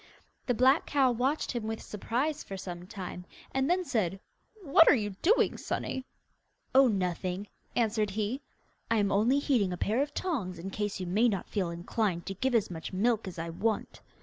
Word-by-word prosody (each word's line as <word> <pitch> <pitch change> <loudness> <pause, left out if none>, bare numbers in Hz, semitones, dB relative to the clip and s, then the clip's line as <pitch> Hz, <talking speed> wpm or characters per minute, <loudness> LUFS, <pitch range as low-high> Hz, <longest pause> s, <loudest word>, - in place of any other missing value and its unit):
The 245 - +2
black 260 +6 +4
cow 270 -3 +3
watched 260 +6 0
him 235 -3 -3
with 220 0 -3
surprise 260 +9 -2
for 195 - -7
some 180 -1 -7
time, 185 -3 -6 0.3
and 265 +2 +1
then 365 +1 +2
said: 195 - 0 0.4
'What 325 +1 +6
are - - +8
you 210 -4 -1
doing, 430 +8 +3
sonny?' 260 - -3 0.7
'Oh, 270 0 +7
nothing,' 185 -1 -1 0.3
answered 220 -2 +1
he; 215 +6 -2 0.5
'I 230 - +3
am 205 -1 +2
only 220 +7 +3
heating 245 -9 +2
a 180 - -3
pair 220 +8 +1
of 290 - -3
tongs 225 - -2
in 185 +4 -6
case 205 0 -2
you 185 - -3
may 210 +7 +3
not 195 -4 -3
feel 190 -4 0
inclined 175 +1 -2
to 195 - -3
give 250 +6 0
as 215 -5 +2
much 160 -2 -6
milk 220 +2 +1
as 185 - -7
I 165 0 -4
want. 215 +5 -2
215 Hz, 190 wpm, -30 LUFS, 190-260 Hz, 0.7 s, are